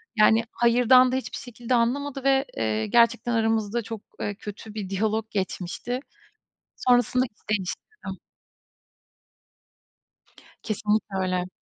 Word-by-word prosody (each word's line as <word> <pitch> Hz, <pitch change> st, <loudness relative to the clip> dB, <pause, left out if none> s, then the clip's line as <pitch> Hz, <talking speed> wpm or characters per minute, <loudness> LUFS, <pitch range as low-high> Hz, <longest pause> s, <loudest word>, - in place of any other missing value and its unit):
Yani, 220 Hz, +1 st, +5 dB
hayırdan 250 Hz, +2 st, +5 dB
da -, -, 0 dB
hiçbir 260 Hz, -, -4 dB
şekilde 240 Hz, +1 st, -4 dB
anlamadı 270 Hz, +3 st, 0 dB
ve, 270 Hz, 0 st, +3 dB
eee, 110 Hz, -1 st, 0 dB
gerçekten 235 Hz, +1 st, +3 dB
aramızda 225 Hz, 0 st, +1 dB
çok, 225 Hz, -1 st, -7 dB, 0.2 s
eee, 205 Hz, -, -3 dB
kötü 210 Hz, +1 st, -9 dB
bir 205 Hz, -3 st, -5 dB
diyalog 215 Hz, +2 st, 0 dB
geçmişti. 195 Hz, +5 st, -3 dB, 0.8 s
Sonrasında 250 Hz, 0 st, +3 dB
iş 210 Hz, -2 st, -17 dB
değiştirdim. 200 Hz, -, -7 dB, 2.4 s
Kesinlikle 210 Hz, -2 st, -1 dB
öyle. 185 Hz, -1 st, -1 dB
225 Hz, 110 wpm, -25 LUFS, 205-245 Hz, 2.4 s, Yani